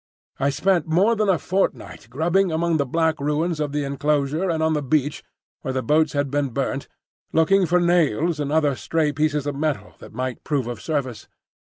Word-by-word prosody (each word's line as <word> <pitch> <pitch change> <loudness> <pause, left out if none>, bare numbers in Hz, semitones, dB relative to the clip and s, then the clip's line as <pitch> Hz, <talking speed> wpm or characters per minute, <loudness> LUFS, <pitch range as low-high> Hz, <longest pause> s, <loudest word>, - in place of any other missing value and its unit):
I 140 - +2
spent 165 +4 +1
more 190 +8 +3
than 215 -2 +1
a 185 - +4
fortnight 190 - -2
grubbing 170 +8 +1
among 165 0 +1
the 140 -2 0
black 160 +2 +1
ruins 150 +3 0
of 150 -2 -1
the 145 0 -1
enclosure 145 +4 0
and 160 -1 0
on 160 0 +2
the 150 - 0
beach 145 +1 0 0.4
where 130 - -4
the 130 - -1
boats 155 +1 +2
had 145 -2 -1
been 145 -1 0
burnt, 135 +2 -3 0.4
looking 180 +4 +3
for 180 +2 +3
nails 170 -3 +2
and 145 -1 -2
other 150 -2 +2
stray 155 +3 0
pieces 150 0 0
of 145 - -2
metal 150 0 -2
that - - -12
might 130 +2 -4
prove 140 -5 -1
of 120 -3 -6
service. 140 -7 -3
150 Hz, 195 wpm, -23 LUFS, 140-165 Hz, 0.4 s, a